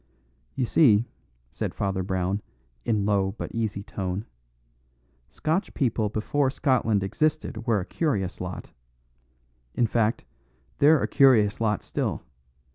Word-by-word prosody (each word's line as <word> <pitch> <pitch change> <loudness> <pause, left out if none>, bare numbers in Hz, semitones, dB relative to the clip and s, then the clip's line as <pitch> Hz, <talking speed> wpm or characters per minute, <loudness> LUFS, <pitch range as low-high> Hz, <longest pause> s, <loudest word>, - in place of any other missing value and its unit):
"You 130 - 0
see," 115 -5 +4 0.5
said - - -4
Father 95 -1 -1
Brown 95 +1 -1 0.4
in 105 -3 +1
low 100 -1 +1
but - - -5
easy 110 -3 -2
tone, 95 +1 -4 1.0
"Scotch 170 +6 -2
people 115 -6 0
before 130 +6 0
Scotland 125 -7 +1
existed 140 +1 -1
were 110 -4 +2
a - - -6
curious 105 - -2
lot. 90 0 -6 1.0
In 120 - +3
fact, 115 0 0 0.5
they're 150 +1 +5
a - - +1
curious 115 -7 +4
lot 105 -2 0
still. - - -3
110 Hz, 120 wpm, -26 LUFS, 100-130 Hz, 1.0 s, they're